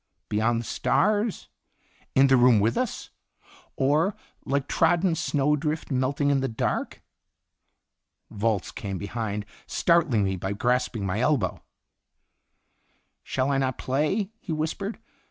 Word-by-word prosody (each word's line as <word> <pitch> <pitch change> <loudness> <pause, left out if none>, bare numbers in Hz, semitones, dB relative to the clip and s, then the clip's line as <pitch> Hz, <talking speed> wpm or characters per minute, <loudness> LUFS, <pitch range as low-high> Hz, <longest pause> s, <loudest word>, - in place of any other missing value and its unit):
Beyond 115 +2 +1
the - - -9
stars, 210 - +1 0.7
in 135 - +6
the 135 -1 +5
room 120 -3 +6
with 110 +3 +2
us, 255 -2 -3 0.6
or 150 +9 +2 0.3
"like 140 0 -1
trodden 175 +2 +2
snowdrift 150 +1 0
melting 140 +2 +1
in 140 - +2
the 135 - 0
dark?" 110 - -3 1.3
Volz 105 -2 -1
came 100 -2 -5
behind, 105 0 -4 0.2
startling 165 - +2
me 95 -1 -1
by 95 +3 -3
grasping 120 -1 0
my 95 +3 -1
elbow. 125 -8 +1 1.6
"Shall 130 +1 -1
I 135 - +2
not 130 -2 -1
play?" 155 +10 0
he 180 - -7
whispered. 160 +7 -2
135 Hz, 120 wpm, -26 LUFS, 110-155 Hz, 1.6 s, in